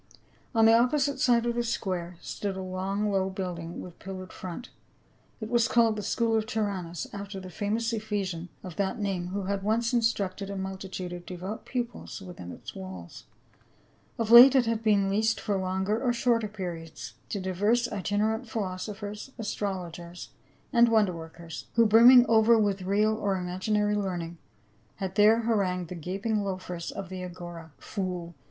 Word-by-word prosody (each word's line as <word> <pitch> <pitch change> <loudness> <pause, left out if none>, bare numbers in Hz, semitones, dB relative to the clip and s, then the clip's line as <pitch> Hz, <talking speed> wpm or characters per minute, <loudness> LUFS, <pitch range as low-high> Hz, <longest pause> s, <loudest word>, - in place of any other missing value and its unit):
359 230 - +1
On 225 - +7
the 230 +1 +7
opposite 285 -2 0
side 240 -2 +3
of 240 - +1
the 240 - 0
square 185 -7 -3
stood 200 -2 -4
a - - -4
long 195 +3 -2
low 190 -1 +1
building 175 -3 -5
with 175 -2 -11
pillared 185 -1 -8
front; 185 +7 -7 0.7
it 220 - -5
was 235 0 +3
called 230 -2 +3
the 210 - -3
school 225 +3 +1
of 220 0 0
Tyrannus 190 -7 -2
after 200 -1 -6
the 185 -1 -9
famous 220 +6 -1
Ephesian 200 -6 -3
of 180 -4 -8
that 195 -1 0
name 195 -4 -2
who 195 +2 -3
had 195 +1 -2
once 225 +4 +1
instructed 200 -4 0
a 200 - -4
multitude 190 -1 -5
of 175 0 -9
devout 185 +4 -6
pupils 245 -3 -4
within 175 - -9
its - - -9
walls. 95 -2 -9 0.9
Of 225 -1 -1
late 250 +3 +11
it 255 -2 +5
had 225 -1 0
been 205 -3 +3
leased 220 +3 +1
for 205 -3 -1
longer 190 +3 -1
or 245 -2 +2
shorter 235 -2 +1
periods 170 - -7 0.2
to 200 - -2
divers 205 +6 +1
itinerant 215 +3 -1
philosophers, 205 +2 -4
astrologers 180 -5 -5 0.4
and 235 -1 +6
wonder 215 -5 +3
workers, 165 -1 -9
who 230 -1 +6
brimming 240 +3 +8
over 225 +1 +5
with 200 -3 +1
real 205 +3 +2
or 205 -3 0
imaginar)^ 205 +3 0
learning 175 -4 -3 0.6
had 190 -2 -4
there 215 +2 +5
harangued 190 -6 0
the - - -5
gaping 195 +6 -2
loafers 185 -3 -4
of 195 -3 -6
the 185 -1 -6
Agora. 175 -2 -8
" - - -37
Fool 180 -4 -4
200 Hz, 170 wpm, -28 LUFS, 185-225 Hz, 0.9 s, late